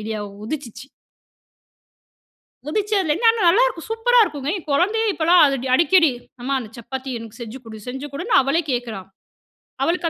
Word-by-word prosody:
Idea 215 0 -4 0.2
உதிச்சிச்சு. 270 -1 -7 1.8
உதிச்சதுல 395 -1 0
இருந்து, 455 +8 +3
ஆனா 455 -1 -2
நல்லாருக்கும். 440 -2 +2
சூப்பரா 475 +2 +3
இருக்குங்க. 290 -7 -2
என் 345 - -9
குழந்தையே 420 +9 +2
இப்போலாம் 340 +1 +4
அது 275 -1 0
டி 265 - -3
அடிக்கடி, 330 0 +4 0.3
அம்மா 275 +2 -1
அந்த 220 -3 -9
சப்பாத்தி 265 +3 -6
எனக்கு 225 +1 -11
செஞ்சு 235 +3 -7
குடு, 220 -1 -9
செஞ்சு 265 +3 -5
குடுன்னு 370 - -2
அவளே 275 +6 +1
கேக்குறா. 240 -5 -3 0.8
அவளுக்கு 335 +1 0
300 Hz, 150 wpm, -21 LUFS, 255-380 Hz, 1.8 s, இப்போலாம்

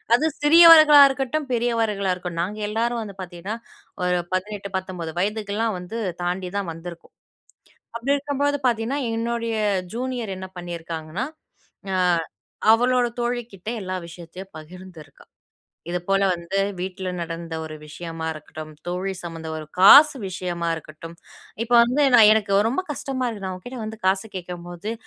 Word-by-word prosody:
அது 305 - +1 0.2
சிறியவர்களா 310 -1 +9
இருக்கட்டும், 270 +2 -2
பெரியவர்களா 225 -5 0
இருக்கட்டும். 175 -2 -4
நாங்க 210 +4 -5
எல்லாரும் 230 +2 -1
வந்து 200 -3 -8
பார்த்தீங்கன்னா. 180 +3 -6 0.5
ஒரு 180 0 +1
18, 200 +1 -3
19 180 -4 -6
வயதுக்கெல்லாம் 210 +1 -1
வந்து 220 +6 -6 0.2
தாண்டி 180 +1 -2
தான் 195 -4 -2
வந்துருக்கோம். 170 +1 -10 0.8
அப்படி 270 +5 +1
இருக்கும்போது 285 0 -1
பார்த்தீங்கன்னா, 235 +5 -1 0.2
என்னுடைய 230 -1 -2 0.4
ஜூனியர் 245 -5 -3
என்ன 190 0 -7
பண்ணிருக்காங்கன்னா, 170 +4 -5 0.7
அ - - +1 0.8
அவளோட 245 +1 +3
தோழி 240 0 -1
கிட்ட 195 +2 -11
எல்லா 185 -1 -4
விஷயத்தையும் 175 +3 -11
பகிர்ந்துருக்கா. 175 0 -12 0.7
இது 180 - -1
போல 195 0 +3
வந்து 175 +3 -3 0.2
வீட்டுல 185 0 -4
நடந்த 165 0 -5
ஒரு 155 -1 -7
விஷயமா 165 +1 -7
இருக்கட்டும். 155 0 -10
தோழி 185 +2 -2
சம்மந்த 165 -2 -7
ஒரு 155 -1 -7
காசு 285 +10 +9
விஷயமா 175 -2 -3
இருக்கட்டும். 160 +1 -10 0.5
இப்ப 240 - -6
வந்து, 255 +5 +1
நான் 220 -3 +9
எனக்கு 200 -2 +2
ரொம்ப 320 +10 -1
கஷ்டமா 265 -2 -3
இருக்கு. 205 -4 -7
நான் 185 - -4
உன்கிட்ட 245 +7 -9
வந்து 220 0 -7
காசு 195 +3 +1
கேட்கும்போது, 175 +3 -6
195 Hz, 135 wpm, -23 LUFS, 175-235 Hz, 0.8 s, சிறியவர்களா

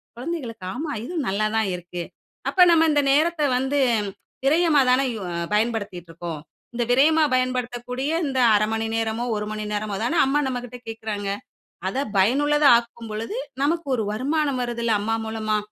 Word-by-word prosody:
குழந்தைகளுக்கு, 245 - -5
"ஆமா, 295 +4 -4
இதுவும் 315 +2 -3
நல்லா 200 +3 0
தான் 220 -3 +1
இருக்கு. 175 0 -7 0.5
அப்ப 365 -1 +6
நம்ம 325 -1 +5
இந்த 290 -1 +3
நேரத்த 315 +3 +2 0.2
வந்து 265 +3 0 0.7
விரையமா 310 0 +4
தானே 255 +2 +4
யூ 220 - -6 0.3
பயன்படுத்திகிட்டு 210 -6 -1
இருக்கோம். 165 -1 -6 0.3
இந்த 240 0 0
விரயமா 310 +5 +5
பயன்படுத்தக்கூடிய 255 +1 -1 0.2
இந்த 265 -1 -1 0.2
1/2 210 +1 +2
மணி 225 0 -1
நேரமோ, 225 +1 -1
1 210 0 -2
மணி 215 0 -4
நேரமோ 210 -1 -2
தானே, 320 +9 0
அம்மா 275 +2 +2
நம்மக்கிட்ட 245 -1 -5
கேக்குறாங்க. 215 -3 -4 0.6
அத 195 - -3 0.2
பயனுள்ளதா 290 +8 +4
ஆக்கும் 235 -1 -8
பொழுது, 225 - -4 0.3
நமக்கு 330 +3 0
ஒரு 220 - -1
வருமானம் 280 +3 0
வருதுல்ல, 235 -1 -1
அம்மா 225 +2 0
மூலமா. 215 -1 -1
240 Hz, 155 wpm, -23 LUFS, 215-285 Hz, 0.7 s, அப்ப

